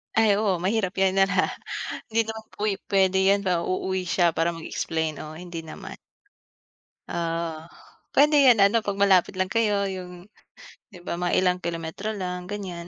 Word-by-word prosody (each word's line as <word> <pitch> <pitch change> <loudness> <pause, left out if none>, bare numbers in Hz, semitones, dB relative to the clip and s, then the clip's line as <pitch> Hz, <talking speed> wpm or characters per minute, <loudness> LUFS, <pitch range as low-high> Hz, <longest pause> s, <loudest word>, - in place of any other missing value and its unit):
Ay, 220 -2 +4
oo, 205 -4 +1
mahirap 195 -1 0
'yan 190 0 +2
na 195 - +6
na 190 -2 +2 0.7
hindi 230 - +3
naman 220 0 -6
puwi 210 -1 0
puwede 190 -1 +3
'yan 200 +1 +3
na 175 -2 +1
uuwi 185 +1 -2
siya 175 -2 +1
para 165 +1 +1
mag-explain. 160 -1 -3
Oo, 155 - -9
hindi 175 -2 -7
naman. 160 - -9 1.2
Oo, 165 -1 -2 0.6
puwede 295 +1 +5
'yon 245 -4 +6
ano, 205 +4 +3
'pag 200 -1 -2
malapit 190 -2 +4
lang 185 0 -1
kayo, 215 -3 +2 0.2
'yong 180 -1 -8 0.8
'di 180 - -12
ba, - - -1
mga 175 - 0
ilang 180 -1 +2
kilometro 165 +4 -4
lang, 180 0 -3
ganiyan. 180 -4 -6
185 Hz, 165 wpm, -25 LUFS, 170-200 Hz, 1.2 s, na